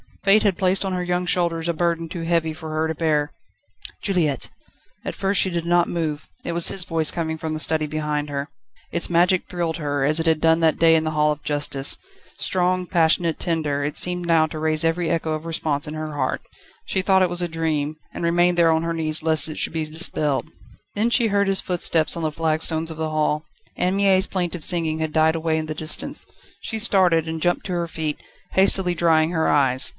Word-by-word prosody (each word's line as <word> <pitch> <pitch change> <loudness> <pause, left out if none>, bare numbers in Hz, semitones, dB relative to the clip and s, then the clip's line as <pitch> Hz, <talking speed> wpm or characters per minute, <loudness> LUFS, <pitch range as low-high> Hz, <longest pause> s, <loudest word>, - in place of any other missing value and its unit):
Fate 200 +2 +4
had 200 -4 +1
placed 190 +1 +1
on 190 - -2
her 180 -1 -2
young 180 0 -1
shoulders 170 -2 +1
a 170 - 0
burden 165 0 -1
too 165 +1 -6
heavy 165 -1 0
for 160 0 -9
her 155 +1 -1
to 160 - -2
bear. 150 -2 0 0.7
"Juliette!" 165 -9 0 0.5
At - - -5
first 195 +1 +1
she 190 - +1
did 170 -2 -3
not 175 0 +2
move. 155 -3 -3 0.2
It - - -3
was 170 0 +3
his 190 - +1
voice 165 -3 +1
coming 160 -2 -2
from 160 0 -4
the 155 - -3
study 155 -1 +1
behind 150 -1 -3
her. 140 0 -4 0.4
Its 170 - 0
magic 175 +2 +2
thrilled 170 -2 -3
her, 145 -3 -2
as 150 +3 +3
it 165 - -1
had 160 -1 +2
done 160 +1 +3
that 160 -2 +2
day 165 0 +5
in 160 - +2
the 155 - -1
Hall 150 0 +2
of 150 0 -5
Justice. 145 -2 +2 0.4
Strong, 185 0 0
passionate, 165 -1 +1
tender, 155 -5 -1
it 145 +1 -3
seemed 180 0 +1
now 165 -2 +4
to 155 - -7
raise 155 0 +1
every 165 +1 0
echo 160 -1 -1
of 155 +1 -5
response 155 -3 -2
in 150 - -6
her 155 -1 -5
heart. 130 -3 -2 0.4
She 190 - -1
thought 190 0 +3
it 180 - +1
was 175 0 0
a 175 - -1
dream, 155 -2 -1 0.2
and - - -6
remained 175 +1 +2
there 165 -1 +5
on 160 0 +1
her 165 0 -2
knees 155 -1 +2
lest 160 -1 +3
it 155 - -7
should - - 0
be 160 -1 -2
dispelled. 155 -2 -2 0.5
Then 215 +3 +1
she 235 -1 +3
heard 200 -1 +1
his 195 0 +3
footsteps 170 -3 +1
on 170 - -4
the 155 - -1
flagstones 160 +1 0
of 160 - -8
the 160 0 -2
hall. 150 0 0 0.3
Anne 180 +2 0
Mie's 195 -1 +3
plaintive 180 -3 -3
singing 165 -3 0
had 160 -1 -3
died 160 0 +3
away 160 -1 -1
in 155 - -2
the 155 - -4
distance. 155 - 0 0.3
She 225 - -4
started, 180 -7 +2
and 160 0 -4
jumped 175 +1 0
to 185 - -3
her 170 -1 -2
feet, 155 -2 -4 0.3
hastily 190 -1 +4
drying 160 -1 +2
her 160 -2 0
eyes. 130 -2 +2
165 Hz, 220 wpm, -22 LUFS, 155-175 Hz, 0.7 s, day